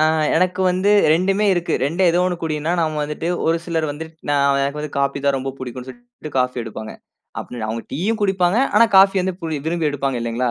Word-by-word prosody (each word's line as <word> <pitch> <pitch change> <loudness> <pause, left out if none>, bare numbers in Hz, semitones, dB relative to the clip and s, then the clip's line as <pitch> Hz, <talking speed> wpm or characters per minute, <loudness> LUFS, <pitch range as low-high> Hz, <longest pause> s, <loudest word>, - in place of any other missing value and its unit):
ஆ - - +4 0.3
எனக்கு 185 +1 +1
வந்து 185 +3 +1 0.2
2மே 195 +5 +1
இருக்கு. 175 -1 -1
2ல 175 +5 +2
ஏதோ 180 +1 +2
1 180 -1 -1
குடின்னா 155 +1 -2
நாம 155 -2 -1
வந்துட்டு 150 +3 -4 0.2
ஒரு 165 +1 +2
சிலர் 165 -2 -1
வந்து 155 +3 -6 0.2
நான் 140 -1 +2
எனக்கு 140 +2 -2
வந்து 150 -1 -6
காபி 140 0 0
தான் 140 -1 +3
ரொம்ப 135 0 -4
புடிக்கும்ன்னு 130 0 -7
சொல்லிட்டு 240 -10 -12
காஃபி 125 0 0
எடுப்பாங்க. 110 -1 -8 0.5
அப்படி 120 -2 -8
அவங்க 115 +1 -3
டீயும் 210 +9 -1
குடிப்பாங்க. 190 +1 +2 0.2
ஆனா 230 +2 +7
காஃபி 195 +1 +6
வந்து 185 -1 -2
பு - - -3 0.2
விரும்பி 165 -2 0
எடுப்பாங்க 135 -3 -2
இல்லைங்களா? 120 +1 -1
155 Hz, 200 wpm, -20 LUFS, 140-185 Hz, 0.5 s, ஆனா